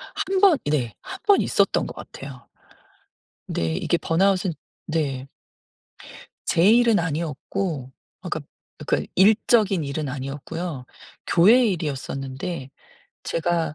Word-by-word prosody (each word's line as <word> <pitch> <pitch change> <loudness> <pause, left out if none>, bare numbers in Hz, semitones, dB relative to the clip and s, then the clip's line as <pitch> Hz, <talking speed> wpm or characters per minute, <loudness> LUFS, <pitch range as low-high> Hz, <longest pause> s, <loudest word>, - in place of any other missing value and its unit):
1 385 0 0
번. 375 -7 +6
네. 130 -7 0
1 385 0 -8
번 405 -2 +5
있었던 - - +2
것 - - -9
같아요. 135 -2 -10 1.0
네. 80 -1 -1
이게 170 - 0
번아웃은 185 +1 +1 0.3
네. 140 -5 -2 1.2
제 170 +2 +3
일은 230 -3 +5
아니었고 160 -2 -3 0.3
그러니까 - - -4 0.4
그러니까 - - -1
일적인 205 -2 +4
일은 140 0 -3
아니었고요. 140 +2 -5 0.4
교회 225 +9 +6
일이었었는데 135 -3 -4 0.5
제가 165 -2 -1
165 Hz, 230 characters per minute, -23 LUFS, 135-195 Hz, 1.2 s, 번